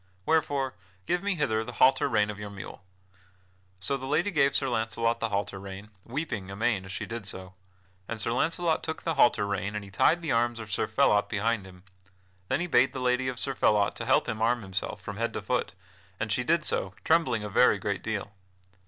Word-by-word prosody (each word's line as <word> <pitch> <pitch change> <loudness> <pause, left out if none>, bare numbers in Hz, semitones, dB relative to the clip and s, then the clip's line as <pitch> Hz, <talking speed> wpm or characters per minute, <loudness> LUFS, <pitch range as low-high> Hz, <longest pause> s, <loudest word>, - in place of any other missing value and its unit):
Wherefore 145 -4 +1 0.3
give 180 0 0
me 200 -1 0
hither 110 -8 0
the 125 +2 -8
halter 130 +3 +4
rein 105 0 +2
of 105 - -10
your 105 0 -6
mule." 100 0 -9 1.0
So 135 +9 -1
the 130 0 -6
lady 165 +8 +1
gave 140 -5 +3
Sir 135 - +2
Launcelot 115 -1 0
the 115 - -1
halter 100 -1 -2
rein, 100 +2 -9 0.2
weeping 115 -7 -3
amain 100 0 0
as 95 - -8
she 90 - -4
did 115 -3 -6
so. 95 -2 -5 0.5
And 115 - -4
Sir 115 - 0
Launcelot 165 +5 +1
took 160 - -5
the 165 - 0
halter 120 -7 +4
rein 100 +1 -2
and 105 - -3
he 100 - -13
tied 170 - +3
the 155 - -1
arms 120 0 +1
of 110 -2 -8
Sir - - 0
Phelot 105 0 +3
behind 105 -1 0
him. 90 -1 -15 0.6
Then 130 +5 0
he - - 0
bade 135 -5 +3
the 130 - -4
lady 125 0 +1
of 130 -2 -3
Sir 135 +2 -2
Phelot 105 -5 +3
to - - -4
help - - +3
him 110 - -3
arm 120 0 +2
himself 95 +1 -3
from 100 +1 -7
head 115 0 -1
to - - -3
foot, - - -1 0.5
and - - -2
she - - +1
did - - +2
so, 95 0 -1
trembling 160 -10 +2
a - - -3
very - - +5
great - - -2
deal. - - -3
115 Hz, 215 wpm, -28 LUFS, 100-135 Hz, 1.0 s, very